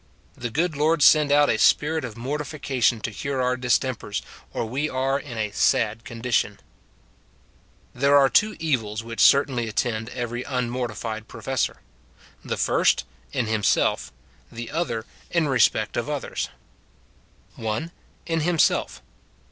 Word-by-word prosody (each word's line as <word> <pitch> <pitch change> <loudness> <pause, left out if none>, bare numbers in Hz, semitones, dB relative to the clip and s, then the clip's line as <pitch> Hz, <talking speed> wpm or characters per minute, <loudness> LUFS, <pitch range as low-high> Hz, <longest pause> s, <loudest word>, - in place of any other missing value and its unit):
The 120 - -5
good 160 +7 0
Lord 150 +1 +2
send 150 -2 +6
out 145 0 +5
a 110 - +1
spirit 155 +6 +3
of 115 -4 -6
mortification 135 -3 -1
to 115 - -3
cure 135 +6 -3
our 125 0 +1
distempers, 125 -3 -1 0.3
or - - -2
we 135 +7 -2
are 135 +1 0
in 130 -5 -8
a 105 -1 -1
sad 110 +2 +1
condition! 115 -3 -1 1.3
There 140 +3 +4
are 140 -1 +6
two 210 - +2
evils 115 -9 -1
which 115 0 -7
certainly 135 -4 +4
attend 110 +1 -2
every 120 -1 -4
un 125 -3 -2
mortifiod 110 -3 -4
professor; 115 +3 -2 0.3
— - - -27
the - - -3
first, - - +2 0.3
in 125 - 0
himself; 110 -2 +1 0.4
the 120 0 -7
other, 120 -9 -2 0.2
in 170 -3 +1
respect 130 -3 +2
of - - -2
others: - - -3 0.5
— - - -33
1. 115 +9 -3 0.3
In 165 -1 0
hijiiself. 165 0 +1
125 Hz, 140 wpm, -24 LUFS, 115-145 Hz, 1.3 s, send